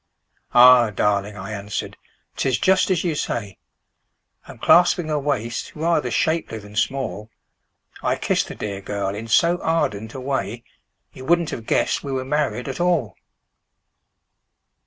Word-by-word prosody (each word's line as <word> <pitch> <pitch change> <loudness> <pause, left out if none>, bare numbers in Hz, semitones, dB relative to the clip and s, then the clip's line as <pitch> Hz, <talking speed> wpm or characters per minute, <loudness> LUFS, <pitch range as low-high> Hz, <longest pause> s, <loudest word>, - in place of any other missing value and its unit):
"Ah! 125 -1 +8
darling," 105 0 0
I 95 +2 -7
answered, 100 0 -5 0.4
"'tis 130 -4 0
just 190 - +3
as 180 -3 +1
you 170 -3 0
say;" 110 -8 -4 0.9
And - - -12
clasping 175 -2 +4
a 150 - +1
waist 120 -5 -3
rather 155 -4 0
shapely 160 -3 0
than 105 -1 -12
small, 115 -3 -2 0.7
I - - +1
kissed - - 0
the - - -8
dear 100 -2 -5
girl 100 -1 -3
in 110 +3 -6
so 170 +8 +3
ardent 110 -9 -1
a - - -5
way 120 -4 -3 0.5
You 130 - -10
wouldn't 170 0 +2
have 115 - -7
guessed - - +1
we 140 - -5
were 130 -1 -2
married 145 -2 -1
at 135 - -5
all! 170 - +1
125 Hz, 145 wpm, -22 LUFS, 105-155 Hz, 0.9 s, Ah